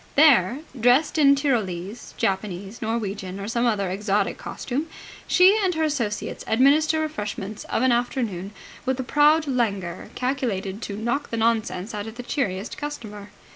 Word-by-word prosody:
There, 275 - +5 0.2
dressed 255 +7 +3
in 280 -1 +6
Tyrolese, 220 - -2
Japanese, 195 +1 -2
Norwegian, 200 -4 -3
or 200 - -5
some 235 +2 +1
other 200 -5 0
exotic 205 +1 0
costume, 280 +5 -4 0.4
she 370 +3 +6
and 365 -3 +1
her 320 - 0
associates 245 -9 -2
administer 285 +7 +4
refreshments 210 -8 -4
of - - -1
an 260 - +4
afternoon 235 -6 -1 0.3
with 260 0 -1
a - - -1
proud 300 +4 +4
languor 200 - -2
calculated 230 -7 -2
to 200 -3 -5
knock 240 +6 -2
the 230 - -3
nonsense 225 -3 0
out 205 0 -4
of 220 - -8
the 245 - -7
cheeriest 220 -5 -3
customer. 215 -9 -7
230 Hz, 150 wpm, -24 LUFS, 200-275 Hz, 0.4 s, in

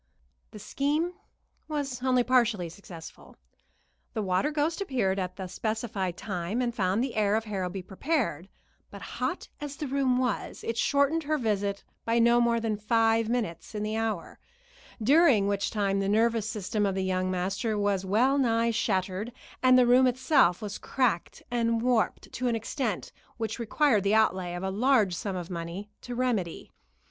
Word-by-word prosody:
The 215 - -11
scheme 295 - -1 0.5
was 285 -5 -3
only 255 -1 +3
partially 235 -8 +2
successful. 165 -2 -12 0.8
The 220 - -1
water 185 +9 +1
ghost 305 +4 -1
appeared 240 - 0
at 185 -1 -3
the 190 - -5
specified 205 -1 -3
time, 190 +2 -3
and 240 -2 0
found 195 +1 +1
the 265 - -3
heir 210 -1 +2
of 220 - 0
Harrowby 190 -3 -4
prepared; 195 - -2 0.4
but - - -10
hot - - -3
as 290 -1 -6
the 300 - -4
room 265 -2 +1
was, 250 -4 -2
it 230 - -2
shortened 280 +6 +2
her 310 +1 +1
visit 200 -5 -1 0.2
by 230 +1 +1
no 235 +1 +5
more 235 -1 +2
than 220 -2 -1
five 225 +1 +2
minutes 220 -5 -3
in 210 - -2
the 215 +1 -2
hour, 220 -6 -3 0.6
during 275 - +5
which 200 0 0
time 200 -2 0
the 195 0 0
nervous 225 0 +2
system 210 0 -2
of 195 -2 +1
the 190 - -1
young 185 0 0
master 195 +4 -1
was 200 -2 +1
well 245 +9 +2
nigh 230 -2 +2
shattered, 195 0 -1 0.3
and 255 0 +6
the 250 - +6
room 250 +2 +5
itself 250 - +3
was 205 -1 -5
cracked 240 -10 -1
and 230 -1 +1
warped 245 -3 0
to 250 - -2
an 235 - +1
extent 225 - -3 0.3
which 225 0 -3
required 235 -2 +2
the 200 +2 +3
outlay 185 -5 +2
of 175 - -5
a 190 - -1
large 220 -2 +3
sum 190 +2 -3
of 180 0 -5
money 175 +4 -6
to 245 - -6
remedy. 235 -9 -2
220 Hz, 170 wpm, -28 LUFS, 195-250 Hz, 0.8 s, and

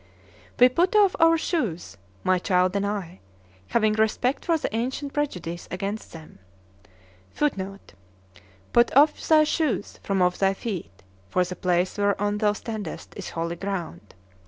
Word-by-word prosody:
We 250 - +9
put 345 - +1
off 405 -3 +5
our 330 0 +6
shoes, 195 - -2 0.3
my 185 -1 +2
child 180 +1 +1
and 200 0 0
I, 190 -4 -4 0.5
having 215 -2 +2
respect 220 +5 0
for 335 -2 +2
the 255 - -3
ancient 265 +4 -3
prejudice 180 - -3
against 200 +4 -4
them; 160 -8 -12 1.0
[Footnote: 195 -9 -3 0.8
"Put 235 0 +5
off 295 +2 +5
thy 310 -1 +6
shoes 305 -8 -1
from 195 -2 +1
off 180 0 +1
thy 195 0 +2
feet, 175 - -6 0.3
for 180 - +2
the 180 +1 -6
place 180 +2 0
whereon 205 +1 +1
thou 210 -1 +2
standest 210 -4 -6
is - - -6
holy 170 +1 -3
ground." 180 - -5
205 Hz, 145 wpm, -25 LUFS, 180-255 Hz, 1.0 s, We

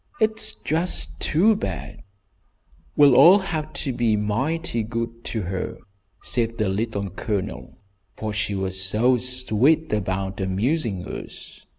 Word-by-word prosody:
It's 220 0 +2
just 165 +3 -2
too 200 +8 +3
bad!" 95 - -5 1.0
"We'll 145 -2 +7
all 180 +9 +8
have 155 -6 -3
to 135 - -1
be 120 -3 +1
mighty 120 +7 -1
good 115 +1 -4
to 110 -3 -3
her," 90 +1 -4 0.5
said 115 -1 -1
the 105 -3 0
Little 100 -1 -2
Colonel, 100 0 -4 0.4
"for 110 -1 -4
she 105 -1 -1
was 95 -1 -2
so 115 +6 +3
sweet 125 +5 +2
about 95 -1 -2
amusing 100 - -1
us. - - -9
115 Hz, 125 wpm, -23 LUFS, 100-150 Hz, 1.0 s, all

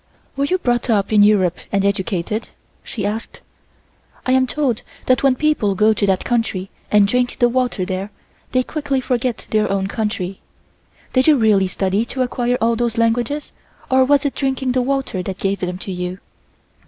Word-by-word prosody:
"Were 275 - +1
you 365 +5 +1
brought 245 -7 -1
up 210 -1 +1
in 210 - +6
Europe 200 -4 +4 0.2
and 195 0 +1
educated?" 200 +1 -1 0.3
she 205 -4 -4
asked. 215 +2 -4 0.9
"I 255 - +1
am 260 0 +3
told 260 -5 -1 0.2
that 255 - +3
when 270 -2 +4
people 255 -9 +1
go 215 +3 +4
to 200 -1 0
that 190 -1 +1
country 225 -6 -1 0.2
and 205 -1 +5
drink 250 +3 0
the 240 - +4
water 245 -6 0
there, 190 +2 -3 0.4
they 255 -1 +2
quickly 290 -1 -2
forget 250 -2 -2
their 215 -1 +2
own 195 -1 0
country. 195 -3 -3 0.7
Did 255 +2 +3
you 310 - +7
really 210 -5 +3
study 190 +3 0
to 260 +2 -2
acquire 245 0 0
all 230 +1 +2
those 235 0 -1
languages 240 +6 0 0.4
or 260 0 +5
was 280 +2 +3
it 285 - 0
drinking 265 -1 -1
the 255 0 +1
water 265 -6 -1
that 190 0 -5
gave 195 0 -1
them 180 0 -3
to 195 - -6
you?" 180 0 -4
230 Hz, 180 wpm, -19 LUFS, 195-255 Hz, 0.9 s, you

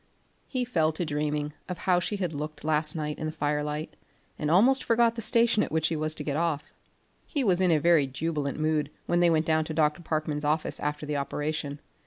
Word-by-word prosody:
He 255 -2 -1
fell 160 -10 +1
to 170 +2 -2
dreaming 150 0 -2 0.2
of 180 - -3
how 180 -2 +2
she 190 +4 -2
had 180 -5 -2
looked 150 +1 -6
last 155 0 +2
night 150 -1 -3
in 155 - -2
the - - -3
fire 150 -1 -1
light, 150 +1 -4 0.4
and 150 - -1
almost 245 +11 +5
forgot 230 0 +3
the 230 - -5
station 230 0 +3
at - - -2
which 160 0 +1
he 165 - -1
was 155 0 0
to - - -4
get 145 - -2
off. 160 -2 -1 0.5
He 285 -4 -1
was 185 -5 +2
in 170 -4 +4
very 155 -2 +4
jubilant 145 +1 -3
mood 155 -2 0 0.2
when 175 - +1
they 175 -1 +5
went 160 -1 +2
down 160 0 +2
to 155 - -5
Dr. 150 +1 +2
Parkman's 155 -2 -2
office 155 +2 0
after 150 +1 -3
the 150 -1 -2
operation. 145 0 -3
155 Hz, 220 wpm, -27 LUFS, 150-175 Hz, 0.5 s, almost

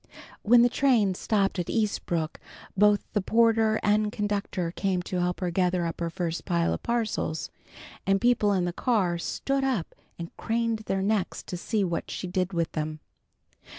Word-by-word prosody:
When 235 +2 +6
the - - +6
train 240 -6 +2
stopped 195 0 0
at 175 - -2
Eastbrook, 175 -7 -1 0.4
both 205 +1 +4
the 205 - +1
porter 225 +1 +3
and 210 0 +2
conductor 205 -5 -2
came 185 -1 -1
to 180 0 -2
help 180 +1 -1
her 180 -1 -1
gather 180 0 +1
up 165 - -4
her 170 -1 -1
first 170 0 -3
pile 170 -2 +1
of - - -4
parcels, 225 -9 -2 0.6
and 195 0 +3
people 235 -3 +3
in 185 -3 +1
the 175 - -2
car 185 -7 +1
stood 275 +9 -1
up 250 -11 -1 0.2
and 170 -1 -8
craned 230 0 -1
their 195 0 0
necks 205 -2 -1
to - - -6
see 205 +4 -1
what 170 -3 -2
she - - -4
did 180 +1 -1
with 170 -3 -1
them. 155 0 -3
195 Hz, 175 wpm, -27 LUFS, 175-220 Hz, 0.6 s, When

